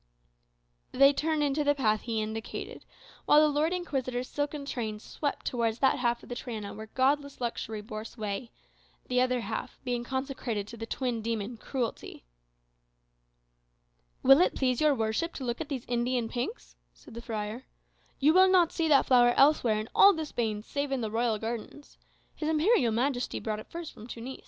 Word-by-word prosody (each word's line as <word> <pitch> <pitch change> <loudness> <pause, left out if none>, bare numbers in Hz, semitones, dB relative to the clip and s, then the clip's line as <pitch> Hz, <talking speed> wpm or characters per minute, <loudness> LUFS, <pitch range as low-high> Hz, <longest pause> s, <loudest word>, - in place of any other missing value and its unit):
They 275 +2 +6
turned 310 +1 0
into 290 +1 +1
the 290 0 +3
path 215 -6 +1
he 225 -2 -2
indicated, 220 +1 -6 0.4
while 295 - +6
the 305 - +6
Lord 310 +3 +2
Inquisitor's 260 -8 -2
silken 290 0 -3
train 220 -6 -4
swept 285 +6 -4
towards 230 -2 0
that 265 0 +2
half 240 -1 0
of - - -14
the - - -3
Triana 220 -4 -6
where 220 +1 -8
godless 280 +4 0
luxury 225 -3 -3
bore 215 0 -6
sway; 220 +1 -5 0.6
the 250 0 +3
other 255 -1 +1
half 225 +4 -5
being 245 -2 -2
consecrated 260 -5 -3
to 235 - -9
the 225 0 -6
twin 245 -3 -2
demon, 225 +1 -3
cruelty. 235 - -5 2.0
"Will 270 +5 +7
it - - +2
please 255 -1 +1
your 300 -2 +4
worship 225 +9 -1
to 270 - -5
look 240 +1 -3
at 315 - -5
these 265 -5 -4
Indian 240 0 0
pinks?" 60 - -5 0.2
said - - -15
the 235 - -7
friar. 220 +2 -5 0.5
"You 295 +3 +4
will 375 +1 +6
not 360 -3 +4
see 330 -2 0
that 285 -3 +5
flower 240 -2 +5
elsewhere 260 -7 +4
in 215 - -5
all 400 0 +8
the 320 -3 -3
Spains, 220 -6 -3
save 285 -1 -3
in 270 -2 0
the 220 -2 -3
royal 225 -1 +1
gardens. 230 +6 -7 0.3
His 310 - -3
Imperial 315 - +3
Majesty 250 +2 -1
brought 215 -1 -3
it - - -11
first 335 -1 -7
from 215 - -12
Tunis." 245 +2 -7
245 Hz, 180 wpm, -29 LUFS, 225-285 Hz, 2.0 s, all